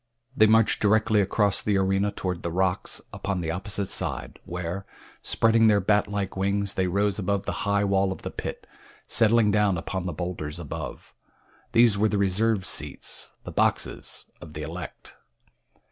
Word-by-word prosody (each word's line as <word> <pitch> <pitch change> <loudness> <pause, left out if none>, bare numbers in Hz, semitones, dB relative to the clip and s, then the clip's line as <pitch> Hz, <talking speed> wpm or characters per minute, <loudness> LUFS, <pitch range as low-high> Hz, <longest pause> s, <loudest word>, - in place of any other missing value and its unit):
They 110 - +6
marched 110 0 +4
directly 110 0 +3
across 100 0 +2
the 105 -2 +1
arena 95 +1 +1
toward 90 -3 -4
the 85 - -3
rocks 95 +1 -1
upon 100 -2 -3
the 80 -1 -2
opposite 95 +3 -2
side, - - -2
where, 90 +2 -4 0.4
spreading 115 0 +3
their 105 -2 +5
bat 105 +2 +2
like 100 -2 -3
wings, 100 +1 0
they 95 -1 0
rose 100 +2 0
above 100 0 -1
the - - -1 0.2
high 100 0 +2
wall 95 -1 +2
of - - -7
the - - -4
pit, - - -6 0.4
settling 115 -1 +4
down 105 -3 +2
upon 90 +2 -4
the 90 - -3
bowlders 80 -2 -4
above. 85 -5 -7 0.6
These 115 -4 +5
were 110 +1 +3
the 105 - 0
reserved 100 +1 +1
seats, - - -1
the - - -7
boxes - - -1
of 80 -2 -11
the 75 0 -5
elect. 85 +4 -8
100 Hz, 165 wpm, -26 LUFS, 90-105 Hz, 0.6 s, They